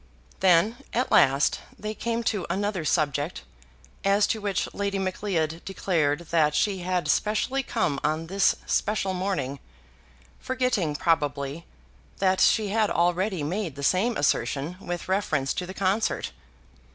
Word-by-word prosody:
Then, 190 +5 +4 0.2
at 250 +2 0
last, 135 +2 +4 0.2
they 215 0 -4
came 235 +1 -2
to 210 -5 -1
another 200 -3 -1
subject, 150 0 0 0.6
as 200 +1 +4
to 220 - -2
which 200 -3 -1
Lady 200 -1 -2
Macleod 185 -4 -2
declared 165 -6 0
that 155 -3 +3
she 195 +1 +1
had 180 -3 -1
specially 215 - +1
come 145 - -1
on 155 +1 0
this 195 +3 +2
special 200 -2 0
morning, 180 -8 -2 0.8
forgetting, 250 -12 0
probably, 145 -1 -1 0.5
that 190 -1 +2
she 215 -2 +4
had 215 0 +2
already 175 0 +1
made 170 0 -3
the 140 - -7
same 210 - +2
assertion 140 +4 0
with 175 -2 -5
reference 155 -8 0
to 180 - -4
the 190 - -6
concert. 200 +3 0
185 Hz, 135 wpm, -26 LUFS, 155-205 Hz, 0.8 s, Then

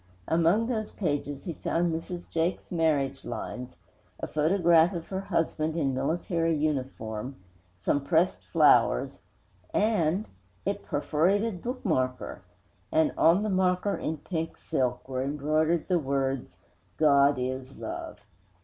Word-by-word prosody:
Among 170 +7 +3
those 220 -3 -2
pages 145 -6 -2
he 170 - -4
found 170 +2 0
Mrs. 175 +2 -5
Jake's 165 +2 -2
marriage 155 -5 +1
'lines,' 125 +2 -6 0.4
a - - -2
photograph 165 +2 +3
of 170 -2 -6
her 190 - -2
husband 165 -4 -1
in 140 -5 +1
military 165 +4 0
uniform, 130 -5 -2 0.4
some 135 +11 0
pressed 160 - +2
flowers - - +4 0.6
and 205 -3 +2 0.4
a - - +2
perforated 175 - 0
bookmarker! 160 - -2 0.5
And 160 -1 +3
on 175 +5 +4
the 215 - -1
bookmarker, 185 +1 +1
in 160 - -2
pink 165 +1 -4
silk, 125 -1 -1
were 130 -1 -2
embroidered 155 +4 0
the 180 -2 +2
words: 135 - -2 0.4
GOD 140 -2 +5
IS 130 +1 -4
LOVE. - - -6
160 Hz, 120 wpm, -28 LUFS, 135-175 Hz, 0.6 s, GOD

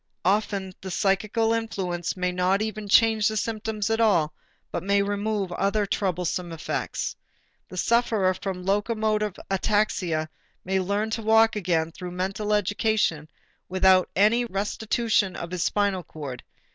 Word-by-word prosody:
Often 195 -1 0
the 190 - -6
psychical 215 +4 +1
influence 190 -7 -2
may 180 0 0
not 185 +3 +1
even 215 -1 -5
change 220 0 +5
the 215 -1 -1
symptoms 215 -1 -2
at 225 +1 +1
all 170 -9 +3 0.4
but - - -2
may 200 +2 +2
remove 205 -1 -1
other 200 +3 +1
troublesome 180 -3 -2
effects. 165 0 -3 0.5
The 185 - -9
sufferer 220 -2 +2
from 185 -1 -5
locomotor 215 +1 +1 0.2
ataxia 190 -6 +1 0.4
may 190 +1 +1
learn 200 +4 -1
to 225 - -2
walk 225 +1 +4
again 170 -5 0
through 180 +1 -7
mental 195 +3 -2
education 205 -6 +1 0.4
without 185 0 +4
any 215 +5 +4
restitution 215 0 0
of 170 - -6
his 180 -2 -1
spinal 200 -3 +1
cord. 145 -6 -8
200 Hz, 135 wpm, -25 LUFS, 180-215 Hz, 0.5 s, change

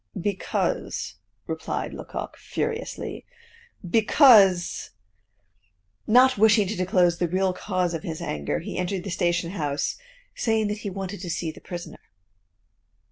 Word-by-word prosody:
"Because," 200 +2 -2 0.3
replied - - -4
Lecoq, - - -6
furiously, 460 +1 -4 0.6
"because 210 - +5 0.6
" 95 +1 -44
Not 255 -3 +6
wishing 215 -1 +5
to 215 - -2
disclose 180 -2 +2
the 175 - +1
real 185 +2 +1
cause 180 -2 -1
of 165 - -3
his 160 -1 -5
anger, 75 0 -2
he - - -5
entered 180 0 -2
the 195 - -5
station 175 -1 0
house, 150 -6 -2 0.4
saying 220 -2 0
that 210 0 -3
he 205 - -4
wanted 195 0 -5
to 180 - -5
see 165 -1 -2
the - - -15
prisoner. 175 -1 -8
185 Hz, 135 wpm, -25 LUFS, 170-210 Hz, 0.6 s, Not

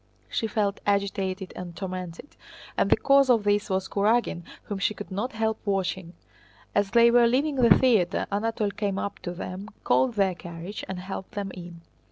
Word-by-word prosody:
She 225 - -1
felt 205 -2 -1
agitated 195 -1 -1
and 175 -2 -7
tormented, 185 - -6 0.4
and - - +1
the - - +5
cause 275 -1 +4
of 230 -4 +4
this 205 0 +1
was 190 0 0
Kurágin 210 -3 +1 0.2
whom 205 -2 -5
she 210 +2 0
could 205 - -9
not 210 +7 -3
help 220 0 -1
watching. 190 -3 -2 0.6
As 205 -1 +2
they 235 +1 +6
were 240 0 +6
leaving 275 +4 +1
the 235 -6 +6
theater 215 -8 +2
Anatole 210 0 -1
came 200 -1 -2
up 200 0 -4
to 175 - -5
them, 185 +2 -6 0.2
called 255 -3 +2
their 195 -2 +2
carriage, 175 +3 -8
and 190 - -4
helped 190 +3 -7
them 200 -3 -4
in. 175 -2 -10
200 Hz, 180 wpm, -26 LUFS, 185-225 Hz, 0.6 s, they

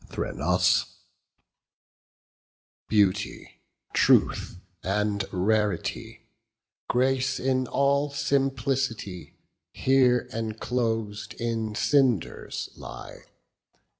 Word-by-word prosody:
THRENOSBEAUTY, 100 -4 0 0.3
truth, - - +3 0.3
and 100 +1 0
rarity, 105 0 -1 0.7
Grace 130 +1 +1
in 130 -1 0
all 140 +1 +2
simplicity, 135 -8 -1 0.4
Here 130 -2 +3
enclosed 110 -1 -2
in 115 -2 -2
cinders 120 - +1
lie. - - -10
115 Hz, 55 wpm, -26 LUFS, 105-135 Hz, 0.7 s, truth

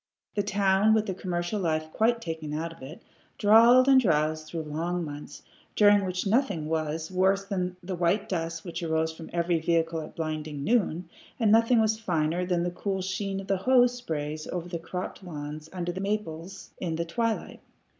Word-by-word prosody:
The 205 - +1
town, 200 +1 +3
with 220 -1 +2
the 195 - -2
commercial 180 +2 -3
life 155 -2 -1
quite 230 +1 +2
taken 160 -2 -4
out 165 +2 -3
of 165 - -19
it, 140 +7 -10 0.3
drawled 230 +5 +6
and 265 -1 +7
drowsed 155 -5 +1
through 165 -2 -4
long 165 +3 -2
months, 145 -1 -9 0.3
during 205 -1 +5
which 180 +1 -2
nothing 200 - +1
was 160 +1 -2
worse 190 +2 +2
than 180 -2 -2
the 185 +1 -4
white 180 +4 +1
dust 165 -3 -3
which 175 - -5
arose 160 -1 0
behind 160 0 -10
every 170 0 +1
vehicle 165 0 0
at 155 - -10
blinding 155 -3 -4
noon, 180 -4 +1 0.3
and 220 -3 +3
nothing 230 +2 +5
was 220 0 +2
finer 175 -3 0
than 175 -2 +1
the 175 - -1
cool 190 +1 -3
sheen 195 +1 -2
of - - -10
the 195 0 0
hose 245 +4 +4
sprays 155 -9 -4
over 175 -1 -4
the 170 -1 -4
cropped 180 +3 -6
lawns 150 -2 -7
under 175 -1 -3
the 185 +2 -5
many 205 +2 +1
maples 175 -1 -10
in 165 -3 -2
the 170 +1 -2
twilight. 225 +7 -2
175 Hz, 190 wpm, -27 LUFS, 160-200 Hz, 0.3 s, and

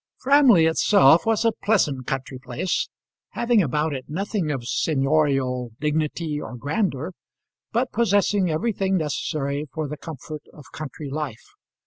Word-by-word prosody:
Framley 260 - +5
itself 160 0 +5
was 225 0 +2
a 230 - +5
pleasant 150 - +1
country 135 -1 -4
place, 130 +7 -2 0.4
having 235 -2 +3
about 150 0 0
it 130 -2 -5
nothing 190 +1 -2
of 135 -5 -2
seignorial 135 -4 +1
dignity 150 0 -1
or - - -7
grandeur, 155 - -1 0.6
but 245 +2 0
possessing 205 -4 +2
everything 190 +3 0
necessary 150 -2 -2
for 155 -2 -3
the 150 +2 -6
comfort 155 0 -8
of 150 - -13
country 150 -1 -7
life. 145 -6 -5
155 Hz, 130 wpm, -23 LUFS, 140-195 Hz, 0.6 s, Framley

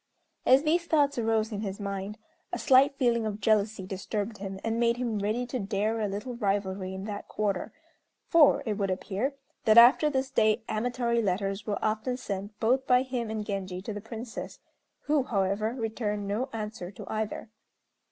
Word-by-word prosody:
As 260 +3 +6
these 335 +2 +1
thoughts 285 -5 +2
arose 225 -1 +1
in 205 -1 -3
his 200 -1 -4
mind, 200 +1 -4 0.3
a - - -2
slight 275 +1 +5
feeling 235 -3 +2
of 210 -1 -4
jealousy 210 -1 +1
disturbed 205 +3 -4
him, 195 -1 -5
and 225 0 -1
made 235 0 +2
him 235 -4 -1
ready 215 +5 -1
to 250 +1 -4
dare 210 +2 -1
a 215 - 0
little 210 +6 -4
rivalry 195 -3 -1
in 190 - -6
that 205 0 -6
quarter; 200 -3 -2 0.6
for, 320 -4 +5
it 215 -2 -2
would 195 -1 0
appear, 205 +8 -2 0.3
that 220 0 +5
after 245 +6 +8
this 265 -2 -1
day 220 -2 +2
amatory 235 +1 0
letters 195 +1 -1
were 205 - 0
often 220 +4 -1
sent 205 -2 -5
both 255 +4 +2
by 250 0 +5
him 250 -4 -3
and 215 -1 -3
Genji 190 -3 -4
to 215 - -4
the 205 - -6
Princess, 225 +2 -7 0.4
who, 295 -1 +2
however, 215 -1 0
returned 220 -3 -2
no 220 +7 -1
answer 215 -5 -5
to 200 - -10
either. 220 0 -4
220 Hz, 180 wpm, -28 LUFS, 200-245 Hz, 0.6 s, after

